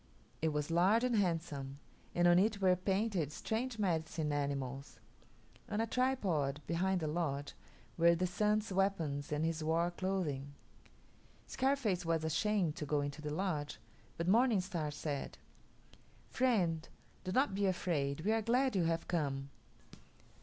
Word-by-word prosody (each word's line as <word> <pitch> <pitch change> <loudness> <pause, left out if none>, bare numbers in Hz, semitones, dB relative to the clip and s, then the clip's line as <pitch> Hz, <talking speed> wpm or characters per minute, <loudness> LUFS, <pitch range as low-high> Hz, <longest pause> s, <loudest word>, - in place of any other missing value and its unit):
It 160 - +2
was 150 +1 -2
large 190 +8 +4
and 250 -2 +2
handsome, 160 -8 -1 0.4
and 175 0 +4
on 175 0 +6
it 205 +1 +2
were 185 -2 +4
painted 190 -4 0
strange 225 +8 -3
medicine 160 -5 -1
animals. 140 -1 -3 0.7
On 210 - -1
a 225 - +2
tripod 195 - 0
behind 180 +3 0
the 155 - -1
lodge 150 -3 -2 0.5
were 170 +1 +6
the 180 +2 0
Sun's 210 +3 0
weapons 165 -8 0
and 150 +1 0
his 165 -1 -1
war 165 +2 +1
clothing. 165 -7 -2 0.9
Scarface 260 -9 0
was 165 -1 0
ashamed 175 0 +1
to 155 - -3
go 145 0 +1
into 145 +1 -4
the 150 - -4
lodge, 150 -3 -2 0.4
but 170 - -2
Morning 230 +2 +4
Star 175 -5 -2
said, 145 -1 -4 0.9
"Friend, 185 -11 +1 0.3
do 185 - -3
not 260 +1 +2
be 200 0 +1
afraid; 160 -6 -1
we 205 +6 +1
are 225 0 +2
glad 250 +3 +2
you 180 -3 +2
have 165 0 -1
come." 140 -5 -2
175 Hz, 145 wpm, -35 LUFS, 150-200 Hz, 0.9 s, on